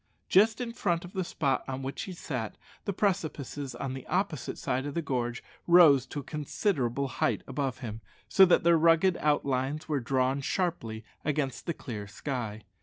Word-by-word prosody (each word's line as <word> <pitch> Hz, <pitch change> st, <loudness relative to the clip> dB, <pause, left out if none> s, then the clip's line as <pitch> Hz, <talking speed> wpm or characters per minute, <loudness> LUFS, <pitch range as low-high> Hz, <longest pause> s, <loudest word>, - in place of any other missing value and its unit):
Just 215 Hz, +4 st, +5 dB
in 240 Hz, -2 st, -3 dB
front 175 Hz, -6 st, 0 dB
of 180 Hz, -, -11 dB
the 190 Hz, -, -1 dB
spot 140 Hz, -5 st, 0 dB
on 135 Hz, 0 st, -4 dB
which 135 Hz, +1 st, -4 dB
he 190 Hz, -, -5 dB
sat, 130 Hz, -, -4 dB, 0.3 s
the 200 Hz, -, 0 dB
precipices 155 Hz, -, -2 dB
on 130 Hz, +1 st, -4 dB
the 130 Hz, -1 st, -8 dB
opposite 180 Hz, -6 st, -1 dB
side 130 Hz, +3 st, -1 dB
of 145 Hz, -, -6 dB
the 170 Hz, -, +1 dB
gorge 120 Hz, -4 st, -2 dB, 0.2 s
rose 155 Hz, -7 st, +7 dB
to 145 Hz, -, -5 dB
a -, -, -14 dB
considerable 140 Hz, -, -1 dB
height -, -, 0 dB
above 135 Hz, -1 st, -3 dB
him, 110 Hz, -2 st, -6 dB, 0.3 s
so 195 Hz, -, +6 dB
that 180 Hz, -, +4 dB
their 170 Hz, -1 st, +5 dB
ragged 165 Hz, +3 st, +5 dB
outlines 140 Hz, -1 st, 0 dB
were 150 Hz, -3 st, 0 dB
drawn 130 Hz, +2 st, +1 dB
sharply 125 Hz, -, -2 dB, 0.2 s
across 145 Hz, -4 st, -1 dB
the 170 Hz, -, -3 dB
clear 105 Hz, -5 st, -6 dB
sky. 110 Hz, -1 st, -4 dB
140 Hz, 180 wpm, -29 LUFS, 130-170 Hz, 0.3 s, rose